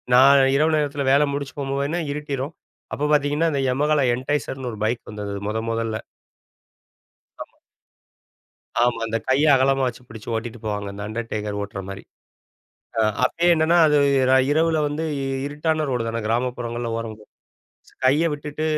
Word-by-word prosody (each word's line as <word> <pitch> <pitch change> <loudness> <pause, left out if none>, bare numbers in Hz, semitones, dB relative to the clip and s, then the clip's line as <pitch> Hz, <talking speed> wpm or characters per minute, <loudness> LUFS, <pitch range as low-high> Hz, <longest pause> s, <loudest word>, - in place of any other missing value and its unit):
நான் 135 +2 +7
இரவு 155 +3 +3
நேரத்தில 145 -1 -1
வேல 140 +2 +5
முடிஞ்சு 140 -1 -4
போகும்போதெலாம் 140 +4 -1
இருட்டிரும். 145 0 -4 0.4
அப்ப 145 - -3
பார்த்தீ்ங்கன்னா, 150 +2 +2
இந்த 140 - 0
Yamaha 145 +2 +2
என்டைசர்னு 130 -1 -3
ஒரு 105 - -9
பைக் 115 +2 -1
வந்தது 105 -1 -5 0.2
மொத 110 +1 -1
மொதல்ல. 115 -1 -2 1.5
ஆமா. - - -27 1.2
ஆமா. 120 -1 +1
அந்த 115 0 -1
கைய 135 +3 +3
அகலமா 135 +1 +2
வச்சு 125 0 -6
பிடிச்சு 110 +1 -8
ஓட்டிட்டு 115 +1 -5
போவாங்க, 105 -1 -3
அந்த 100 +1 -7
அண்டர்டேக்கர் 105 -2 -4
ஓட்டுற 100 -1 -5
மாரி. 95 0 -7 1.0
அ - - +4 0.2
அப்பயே 170 +7 0
என்னன்னா 160 +2 +3
அது 150 -1 +3 0.3
ர - - +5 0.2
இரவுல 160 +1 +2
வந்து 145 +2 -3 0.4
இருட்டான 155 +2 -1
ரோடுதான! 115 -2 -2
கிராமப்புறங்கள்ல 120 0 -2
ஓரம் 115 -1 -5
போ - - -15 0.7
ஸ் - - -26
கைய 145 +6 +4
விட்டுட்டு 150 +1 -5
130 Hz, 145 wpm, -23 LUFS, 115-145 Hz, 1.5 s, நான்